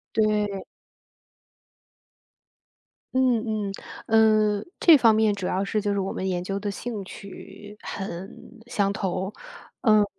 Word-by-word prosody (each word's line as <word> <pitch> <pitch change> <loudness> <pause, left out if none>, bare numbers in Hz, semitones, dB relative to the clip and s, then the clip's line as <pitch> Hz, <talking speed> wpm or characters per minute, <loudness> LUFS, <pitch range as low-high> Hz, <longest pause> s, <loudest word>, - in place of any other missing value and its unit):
对。 210 -2 +1 2.5
嗯 225 -5 +1
嗯。 - - -5 0.9
呃， 200 - -7
这 330 -3 +8
方 225 -3 +5
面 215 -1 +3
主 185 -2 -4
要 190 +2 0
是 215 +2 -1
就 205 0 -1
是 200 - 0
我 190 - -2
们 190 - -3
研 180 -1 -2
究 195 +1 -2
的 205 - -2
兴 210 0 -5
趣 200 +2 -11
很 195 +4 -7
相 200 -4 0
投。 190 0 -2 0.5
嗯， 215 -3 +5
205 Hz, 135 characters per minute, -25 LUFS, 195-215 Hz, 2.5 s, 这